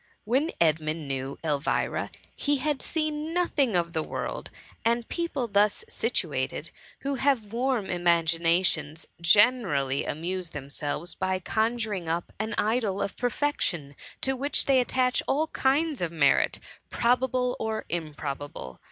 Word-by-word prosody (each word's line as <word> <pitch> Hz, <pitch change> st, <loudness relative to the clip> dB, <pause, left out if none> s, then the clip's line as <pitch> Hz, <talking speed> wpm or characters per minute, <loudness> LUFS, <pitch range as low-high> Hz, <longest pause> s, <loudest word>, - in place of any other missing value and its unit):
When 265 Hz, +9 st, +1 dB
Edmund 155 Hz, -1 st, +1 dB
knew 135 Hz, 0 st, -3 dB
Elvira, 150 Hz, -2 st, 0 dB, 0.3 s
he 290 Hz, -1 st, +1 dB
had 290 Hz, 0 st, -1 dB
seen 310 Hz, 0 st, -1 dB
nothing 285 Hz, -, +2 dB
of 170 Hz, -1 st, 0 dB
the 160 Hz, -, 0 dB
world; -, -, -4 dB, 0.3 s
and 235 Hz, 0 st, +1 dB
people 335 Hz, -8 st, -2 dB
thus 210 Hz, -, +2 dB
situated, -, -, -2 dB, 0.3 s
who 280 Hz, +1 st, -1 dB
have 240 Hz, -7 st, +1 dB
warm 245 Hz, -3 st, +1 dB
imaginations, 170 Hz, -2 st, +2 dB
generally 170 Hz, -, +4 dB
amuse 175 Hz, +3 st, -3 dB
themselves 145 Hz, +3 st, -4 dB
by 190 Hz, 0 st, 0 dB
conjuring 215 Hz, -2 st, -1 dB
up 170 Hz, +1 st, -2 dB
an 220 Hz, +1 st, -2 dB
idol 215 Hz, -3 st, +1 dB
of 200 Hz, -, -2 dB
perfection 225 Hz, -, -1 dB, 0.3 s
to 265 Hz, -, +2 dB
which 280 Hz, +3 st, +1 dB
they 270 Hz, -2 st, +5 dB
attach 250 Hz, 0 st, +2 dB
all 300 Hz, +4 st, +2 dB
kinds 285 Hz, -, +1 dB
of 170 Hz, -2 st, -1 dB
merit, 150 Hz, -4 st, +3 dB, 0.3 s
probable 250 Hz, +1 st, +1 dB
or 220 Hz, 0 st, -2 dB
im 160 Hz, -3 st, -3 dB
probable. 140 Hz, -, -6 dB
205 Hz, 130 wpm, -27 LUFS, 165-255 Hz, 0.3 s, they